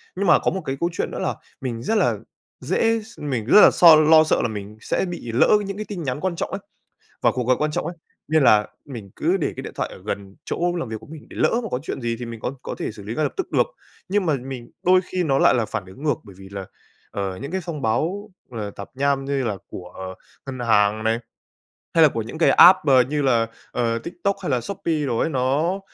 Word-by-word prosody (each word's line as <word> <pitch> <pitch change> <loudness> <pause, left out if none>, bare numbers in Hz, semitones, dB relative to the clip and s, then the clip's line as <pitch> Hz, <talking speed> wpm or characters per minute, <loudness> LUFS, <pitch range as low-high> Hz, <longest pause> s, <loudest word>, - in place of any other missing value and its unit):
Nhưng 195 +2 -1
mà - - +6
có - - 0
một 190 - -3
cái 135 +1 -3
câu 170 - +1
chuyện - - -2
nữa - - -5
là - - -1 0.3
mình 120 -3 -4
rất 220 - 0
là - - +2 0.4
dễ 225 0 +1
s 220 +2 -15
mình 130 -7 -2
rất 205 - +7
là - - +8
so 170 -3 +8
lo 155 +1 +6
sợ 155 - +1
là - - +1
mình 105 -1 -7
sẽ - - -1
bị 175 -10 -6
lỡ 120 - +4 0.2
những 195 0 -5
cái 215 - -4
tin 190 -5 -5
nhắn 130 -1 -2
quan 185 +1 -2
trọng - - -3
ấy, - - -3 0.6
và - - +4
cuộc 125 - -2
gọi 130 0 +4
quan 150 0 0
trọng 150 - -2
ấy. 170 - -5 0.3
Nên 155 -1 +3
là 105 -3 +5 0.2
mình 115 -9 -9
cứ 175 +5 +1
để 165 - -1
cái - - -5
điện - - -7
thoại - - -1
ở 95 - -12
gần 100 -2 -5
chỗ 175 +1 -1
làm 170 -8 -3
việc 110 - -4
của - - -14
mình 155 0 -11
để - - -11
lỡ - - +3
mà 225 - -4
có 125 - -1
chuyện - - -5
gì 115 -1 -2
thì 120 - -5
mình 115 -1 -8
có 125 - -3
có - - -5
thể - - -3
xử 105 - -11
lý 105 +3 -5
ngay 155 - 0
lập - - -1
tức 380 - -3
được. - - +3 0.4
Nhưng 195 0 +1
mà 155 - +2
mình 130 -2 -7
đôi 185 +1 +5
khi 185 0 -2
nó 135 -3 +2
lại - - +5
là 115 -3 +1
phản 100 - -4
ứng 95 +9 -13
ngược, 150 -1 +2
bởi 100 - -13
vì 95 0 -11
là, 100 -1 -7 0.4
ờ, 95 -2 -4
những 140 - -5
cái 190 - -1
thông 160 -5 -5
báo, 180 - -1 0.2
ờ, 110 -4 -5
tạp 100 0 -9
nham 140 0 +1
như 140 -1 -1
là 105 -4 -1
của 95 +1 -8 0.3
ngân 135 -1 -6
hàng 110 -1 +2
này, 115 +1 +2 0.8
hay 165 - +5
là 155 - +8
của 115 -5 -3
những 115 +8 -8
cái 165 - +4
app 185 +1 +8
b - - -2 0.2
như 145 0 -1
là, 120 -4 +3 0.2
ờ, 115 -1 0
TikTok 180 - -3
hay 165 - -2
là 125 -2 +1
Shopee 165 -5 -2
đồ 120 -3 -1
ấy, 160 - +1
nó 150 +8 0
135 Hz, 265 wpm, -22 LUFS, 115-170 Hz, 0.8 s, là